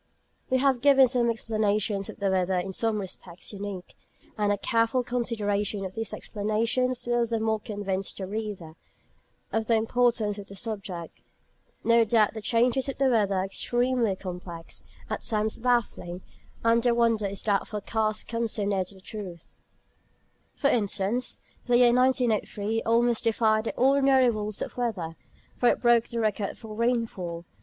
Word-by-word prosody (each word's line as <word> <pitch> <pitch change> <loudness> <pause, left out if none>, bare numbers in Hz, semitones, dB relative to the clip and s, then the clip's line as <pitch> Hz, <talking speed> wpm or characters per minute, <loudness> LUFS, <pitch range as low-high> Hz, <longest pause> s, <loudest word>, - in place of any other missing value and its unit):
We 260 - +3
have 260 -2 +2
given 270 -1 +6
some 240 -1 +2
explanations 215 -3 0
of - - -8
the 200 -1 0
weather 185 0 +1
in 190 +2 -3
some 225 +2 0
respects 185 -1 -7
unique; 200 -3 -6 0.4
and 210 -1 +1
a 205 - +1
careful 230 +4 +1
consideration 210 -4 -1
of 185 - -6
these 225 +1 -3
explanations 230 +4 -1
will 240 0 +2
the 230 -1 -1
more 220 0 0
convince 200 -3 -2
the 190 - -6
reader 200 -5 -5 0.8
of 220 -1 0
the 230 - +4
importance 225 -2 +1
of 200 - -9
the 200 - -10
subject. 195 -5 -5 0.6
No 230 0 +5
doubt 220 -1 +3
the 220 - -6
changes 245 +5 +2
of 275 - -5
the 270 -1 +3
weather 210 -5 +2
are 185 0 +1
extremely 240 +1 0
complex, 180 -3 -7 0.2
at - - -3
times 215 -1 -1
baffling; 225 -7 0 0.4
and 230 0 +4
the 240 0 +2
wonder 230 -3 +2
is 195 0 -6
that 200 -2 +1
forecasts 215 +1 -1
come 230 0 -2
so 210 -2 0
near 200 -2 +1
the 190 +1 -12
truth. 185 -5 -8 1.0
For 280 - +2
instance, 210 +2 0 0.3
the 245 -1 +4
year 240 -1 +6
1903 230 -4 +1
almost 235 0 +2
defied 220 -1 +2
the - - -3
ordinary 270 -1 +4
rules 215 -1 -2
of - - -9
weather, 190 -10 -2 0.4
for 245 - +4
it - - +1
broke 240 -1 +4
the 235 - -3
record 210 -2 -1
for 220 -2 -9
rainfall. 215 -7 -1
220 Hz, 160 wpm, -27 LUFS, 200-240 Hz, 1.0 s, given